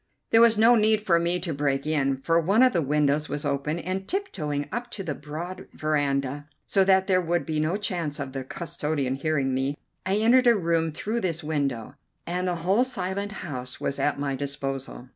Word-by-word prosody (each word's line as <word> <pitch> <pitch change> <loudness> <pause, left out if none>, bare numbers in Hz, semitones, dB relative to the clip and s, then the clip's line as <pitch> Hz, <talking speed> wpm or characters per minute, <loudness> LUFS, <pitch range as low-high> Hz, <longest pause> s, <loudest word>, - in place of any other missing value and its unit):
There 225 - +6
was 230 -2 +6
no 225 +3 +6
need 215 -1 +3
for 175 -5 +3
me 170 +1 +1
to 170 -3 -2
break 140 -1 0
in, 140 -3 +1
for 165 +5 +2
one 200 +9 +4
of 255 -2 +5
the 170 - +2
windows 150 +1 +1
was 145 +1 -4
open, 145 +3 -1
and, 185 +3 -4
tip 395 +1 -2
toeing 145 -4 -2
up 240 +4 -3
on 195 - -5
the 155 - -2
broad 170 +6 -7
veranda, 145 -2 -1 0.2
so 195 - +3
that 190 0 +4
there 185 -2 +3
would 175 0 0
be 155 -2 -1
no 160 +5 0
chance 170 -8 -3
of 135 -2 -4
the 135 0 -4
custodian 150 -3 -3
hearing 140 -1 0
me, 135 +2 -1 0.3
I 190 +1 0
entered 240 +4 +4
a 235 - +7
room 165 -4 +1
through 215 +9 -3
this 175 -3 -2
window, 140 -7 -2 0.3
and 180 +2 -2
the 180 - 0
whole 200 +7 +4
silent 200 -4 -3
house 125 -5 -6
was 140 - -2
at 145 - +1
my 140 -1 -1
disposal. 135 -2 -5
160 Hz, 205 wpm, -26 LUFS, 145-190 Hz, 0.3 s, a